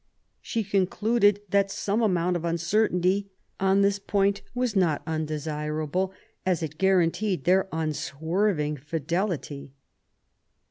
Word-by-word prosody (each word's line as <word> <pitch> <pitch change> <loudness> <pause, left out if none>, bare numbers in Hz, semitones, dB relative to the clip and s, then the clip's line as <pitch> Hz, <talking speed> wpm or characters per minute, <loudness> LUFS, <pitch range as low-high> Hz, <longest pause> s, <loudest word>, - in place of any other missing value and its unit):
She 225 - -2
concluded 205 +2 +2
that 200 0 +2
some 205 +3 -1
amount 180 -4 +1
of 170 - -2
uncertainty 180 +3 +1 0.3
on 195 +1 +3
this 200 0 +2
point 200 0 +1
was 245 -3 0
not 170 -6 +2
undesirable, 155 +2 -2 0.3
as 180 -3 0
it 155 -1 -6
guaranteed 190 +1 +2
their 190 +2 +3
unswerving 160 +1 -1
fidelity. 150 -1 -3
180 Hz, 105 wpm, -26 LUFS, 160-200 Hz, 0.3 s, on